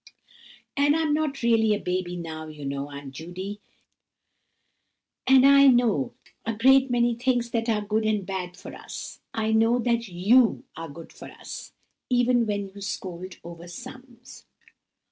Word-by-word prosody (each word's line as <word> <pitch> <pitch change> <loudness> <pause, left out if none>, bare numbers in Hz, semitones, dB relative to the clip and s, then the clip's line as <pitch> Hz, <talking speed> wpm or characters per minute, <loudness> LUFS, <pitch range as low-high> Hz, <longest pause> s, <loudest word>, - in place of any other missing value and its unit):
"And 290 +1 +3
I'm 320 -2 +1
not 300 -4 -1
really 225 -2 +4
a - - -4
baby 180 -1 -2
now, 160 -2 -6
you 150 -2 -9
know, 140 +1 -3
Aunt 140 -1 -8
Judy! 185 +8 -7 1.7
And 265 0 +7
I 280 0 +7
do 260 - +8
know 225 - +1 0.3
a 225 0 -2
great 265 +4 +5
many 240 -1 +2
things 240 0 0
that 230 0 -1
are 215 -2 +1
good 215 +1 0
and 215 -3 0
bad 180 -2 -5
for - - -10
us. - - -8
I 220 0 -1
know 225 +2 +4
that 235 -1 0
you 210 +7 +3
are 165 0 -7
good 165 +3 -11
for - - -11
us, - - -9 0.4
even 245 -2 +3
when 205 -1 -2
you 200 - -11
scold 185 -2 -6
over 170 0 -10
sums." 245 +7 -12
220 Hz, 160 wpm, -26 LUFS, 180-245 Hz, 1.7 s, do